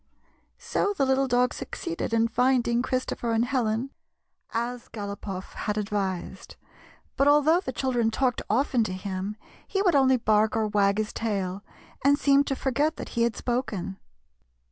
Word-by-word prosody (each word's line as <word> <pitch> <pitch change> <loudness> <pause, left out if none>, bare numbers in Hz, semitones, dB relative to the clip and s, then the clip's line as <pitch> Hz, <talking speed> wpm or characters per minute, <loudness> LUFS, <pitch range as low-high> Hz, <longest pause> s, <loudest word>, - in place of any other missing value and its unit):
So 405 0 -1
the 275 - +3
little 265 +1 +2
dog 250 0 +2
succeeded 335 -7 -5
in 230 0 +3
finding 240 0 +2
Chris 255 0 -1
topher 230 -1 -2
and 225 +1 +2
Helen, 245 0 -1 0.6
as 240 +1 -3
Galopoff 200 -2 -6
had 210 0 -3
advised. 200 -3 -3 0.6
But 275 - +3
although 295 +3 +5
the 310 - -4
children 245 -3 0
talked 245 +1 0
often 245 +1 +2
to 185 - -3
him, 190 +2 -4 0.3
he 390 0 0
would 360 -4 +3
only 265 -2 +5
bark 215 -1 +2
or 220 - +1
wag 200 -1 +2
his 215 0 -2
tail, 200 -3 -2 0.4
and 285 +1 +5
seemed 280 -1 +3
to 270 - 0
forget 285 +5 0
that - - -7
he 235 - -2
had 235 -1 +2
spoken. 220 -7 -3
235 Hz, 160 wpm, -26 LUFS, 210-265 Hz, 0.6 s, although